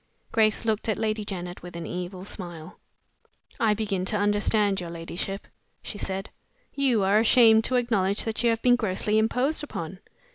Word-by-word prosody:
Grace 220 Hz, 0 st, +2 dB
looked 220 Hz, 0 st, 0 dB
at 215 Hz, -, +1 dB
Lady 215 Hz, -1 st, -1 dB
Janet 180 Hz, -3 st, -5 dB
with 175 Hz, 0 st, -10 dB
an 170 Hz, -1 st, -5 dB
evil 180 Hz, +2 st, -5 dB
smile. 175 Hz, -4 st, -7 dB, 0.8 s
"I 215 Hz, -2 st, +3 dB
begin 200 Hz, -3 st, -2 dB
to 210 Hz, -, 0 dB
understand 205 Hz, -1 st, +2 dB
your 175 Hz, -, -6 dB
ladyship," 170 Hz, +4 st, -5 dB, 0.4 s
she 205 Hz, -, -6 dB
said. 195 Hz, +1 st, -4 dB, 0.4 s
"You 255 Hz, -7 st, +2 dB
are 200 Hz, +2 st, +4 dB
ashamed 225 Hz, -1 st, +6 dB
to 255 Hz, -, 0 dB
acknowledge 210 Hz, -5 st, +1 dB
that 225 Hz, -1 st, -2 dB
you 240 Hz, -, +3 dB
have 225 Hz, 0 st, 0 dB
been 245 Hz, -1 st, +5 dB
grossly 210 Hz, -1 st, +1 dB
imposed 255 Hz, +8 st, +1 dB
upon. 180 Hz, -, -6 dB
210 Hz, 170 wpm, -26 LUFS, 185-225 Hz, 0.8 s, ashamed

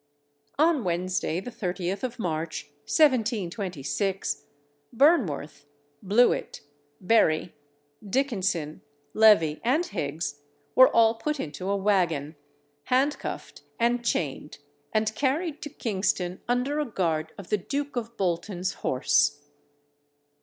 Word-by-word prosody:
On 310 Hz, -3 st, +3 dB
Wednesday, 180 Hz, -1 st, -1 dB
the 245 Hz, +6 st, -7 dB
30th 185 Hz, -2 st, -3 dB
of 250 Hz, -2 st, -4 dB
March, 165 Hz, -6 st, -3 dB, 0.2 s
1726, 200 Hz, -, 0 dB, 0.5 s
Burnworth, 225 Hz, -, +2 dB, 0.4 s
Blewit, 215 Hz, +6 st, +2 dB, 0.4 s
Berry 180 Hz, -5 st, +2 dB, 0.5 s
Dickenson, 195 Hz, -, -1 dB, 0.3 s
Levee, 205 Hz, -9 st, +5 dB
and 285 Hz, +9 st, +2 dB
Higgs, 145 Hz, -, -4 dB, 0.3 s
were 260 Hz, 0 st, +8 dB
all 225 Hz, -1 st, +4 dB
put 300 Hz, +6 st, -3 dB
into 165 Hz, -, -5 dB
a 200 Hz, -, +1 dB
waggon, 175 Hz, -7 st, +1 dB, 0.5 s
handcuffed 270 Hz, +4 st, -1 dB, 0.2 s
and 240 Hz, +1 st, +2 dB
chained, 150 Hz, -, -2 dB, 0.3 s
and 215 Hz, 0 st, +1 dB
carried 295 Hz, +5 st, -1 dB
to 295 Hz, -, -5 dB
Kingston 190 Hz, -7 st, -2 dB
under 250 Hz, +5 st, 0 dB
a 300 Hz, -, 0 dB
guard 165 Hz, -, -1 dB
of 200 Hz, -, -10 dB
the 210 Hz, -, +3 dB
Duke 285 Hz, +8 st, -4 dB
of 235 Hz, -1 st, -4 dB
Bolton's 180 Hz, +1 st, -1 dB
horse. 130 Hz, +2 st, +2 dB
200 Hz, 105 wpm, -26 LUFS, 170-245 Hz, 0.5 s, were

